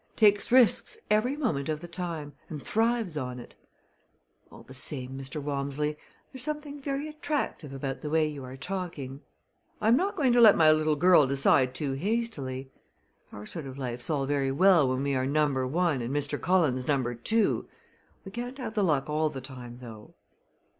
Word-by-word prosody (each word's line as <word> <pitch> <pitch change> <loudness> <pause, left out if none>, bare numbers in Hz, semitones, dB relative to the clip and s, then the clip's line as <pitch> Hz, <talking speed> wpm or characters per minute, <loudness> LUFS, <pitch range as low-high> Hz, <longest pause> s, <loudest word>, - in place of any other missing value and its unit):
Takes 205 -1 +4
risks 260 - +4
every 240 +7 +2
moment 160 - -1
of 155 -1 -1
the 175 - -9
time 165 -4 -5 0.2
and 155 - -5
thrives 225 - 0
on 125 -2 -4
it. 120 - -12 1.0
All - - -13
the 130 - -13
same, 130 0 -2
Mr. 135 +2 -5
Walmsley, 145 +1 -2 0.4
there's 260 - 0
something 295 0 -3
very 275 +2 -3
attractive 300 - -3
about 135 0 -4
the 150 - -4
way 155 0 +2
you 145 -3 -6
are 130 +1 -9
talking. 150 -6 -5 0.6
I 215 - +2
am 235 - +6
not 390 +6 0
going 260 -5 +2
to 240 - +5
let 215 -3 +8
my 155 -1 +6
little 155 0 +2
girl 170 -2 +5
decide 135 -1 +3
too 145 -2 -2
hastily. 140 - -3 0.6
Our 105 0 -9
sort 155 +4 -5
of 130 0 -8
life's 125 -1 -4
all 145 -3 0
very 135 -1 0
well 170 -2 +5
when 130 +1 -1
we 140 0 0
are 130 0 0
number 140 -3 +1
one 160 -2 +1
and 120 +2 -3
Mr. 145 0 -1
Cullen's 155 -9 +2
number 130 -4 +1
two. 215 - +1 0.6
We 195 - -8
can't 245 +4 -6
have 235 -5 -5
the 210 - +1
luck 150 -7 +1
all 155 +1 +1
the 135 - -6
time, 125 -2 -9
though." 110 -3 -11
150 Hz, 185 wpm, -28 LUFS, 135-205 Hz, 1.0 s, let